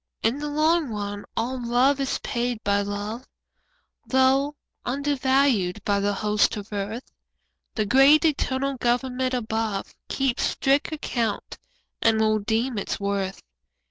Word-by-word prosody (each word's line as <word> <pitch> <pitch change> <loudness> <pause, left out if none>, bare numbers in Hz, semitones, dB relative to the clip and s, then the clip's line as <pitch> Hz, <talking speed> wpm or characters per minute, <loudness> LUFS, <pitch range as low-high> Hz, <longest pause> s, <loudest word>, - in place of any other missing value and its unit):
In 230 +6 +1
the 295 0 -3
long 310 0 +2
run 205 -1 -4
all 245 +2 -2
love 250 +4 +3
is 270 -1 0
paid 240 -1 -2
by 200 0 +2
love, 205 +4 -5 0.8
Though 265 +2 +3 0.3
undervalued 260 -7 +1
by 200 -1 +2
the 200 +1 +1
hosts 210 +1 +1
of 205 +1 -8
earth; 205 +5 -4 0.6
The 215 - 0
great 270 +8 +6
eternal 275 -3 0
Government 250 +1 0
above 220 -4 -2 0.2
Keeps 270 -3 0
strict 280 +4 +1
account 235 -8 -3 0.4
and 225 -1 +3
will 215 0 +3
redeem 225 +2 -1
its - - -3
worth. 200 -1 -2
240 Hz, 130 wpm, -25 LUFS, 210-270 Hz, 0.8 s, great